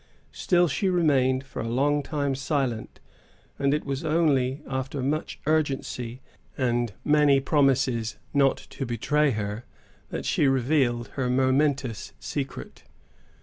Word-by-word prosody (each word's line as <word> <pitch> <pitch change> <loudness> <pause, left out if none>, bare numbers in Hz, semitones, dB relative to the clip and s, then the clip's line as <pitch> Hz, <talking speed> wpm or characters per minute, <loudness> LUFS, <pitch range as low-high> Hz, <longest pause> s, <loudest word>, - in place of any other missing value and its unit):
Still 175 - +2
she 185 +6 0
remained 135 -7 +2
for 135 - -7
a 115 - -3
long 145 +4 +2
time 140 -1 -2
silent, 135 -4 -2 0.6
and 140 0 +2
it 150 +1 0
was 140 +1 -3
only 150 -4 +1
after 130 0 -3
much 150 +4 -2
urgency 135 -5 -1 0.3
and 120 -4 0
many 150 -2 +5
promises 135 -5 +1 0.2
not 140 -1 +3
to 135 - -4
betray 145 +6 +1
her, 105 -1 -3 0.5
that - - -5
she 145 - +2
revealed 125 -3 +1
her 125 +2 -2
momentous 130 -2 +1
secret. 135 - -6
135 Hz, 125 wpm, -26 LUFS, 125-145 Hz, 0.6 s, many